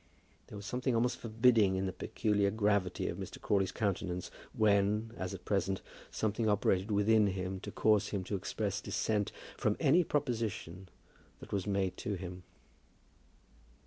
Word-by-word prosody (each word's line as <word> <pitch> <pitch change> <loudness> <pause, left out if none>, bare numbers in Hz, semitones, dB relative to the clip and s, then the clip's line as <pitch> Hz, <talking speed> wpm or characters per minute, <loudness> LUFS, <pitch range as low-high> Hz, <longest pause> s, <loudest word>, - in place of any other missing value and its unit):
There - - -10
was 100 -1 -7
something 125 +3 -1
almost 120 +1 +1
forbidding 115 -3 +3
in 95 +1 -1
the 95 - -2
peculiar 100 +2 0
gravity 100 -3 +1
of - - -4
Mr. - - -7
Crawley's 95 -2 +1
countenance 90 -3 -2 0.2
when, 105 +1 +2
as 95 -1 -4
at 90 - -12
present, 95 -1 0 0.3
something 110 +1 0
operated 100 -1 +2
within 105 +1 +4
him 95 0 -3
to - - -7
cause 105 -1 +3
him 100 -3 -2
to 100 - -3
express 100 +2 -2
dissent 105 -2 -1 0.3
from 105 - +1
any 165 +4 +5
proposition 110 - -2 0.5
that - - -10
was 100 0 -1
made 100 -2 0
to 105 - -3
him. 90 0 -7
100 Hz, 150 wpm, -33 LUFS, 95-110 Hz, 0.5 s, any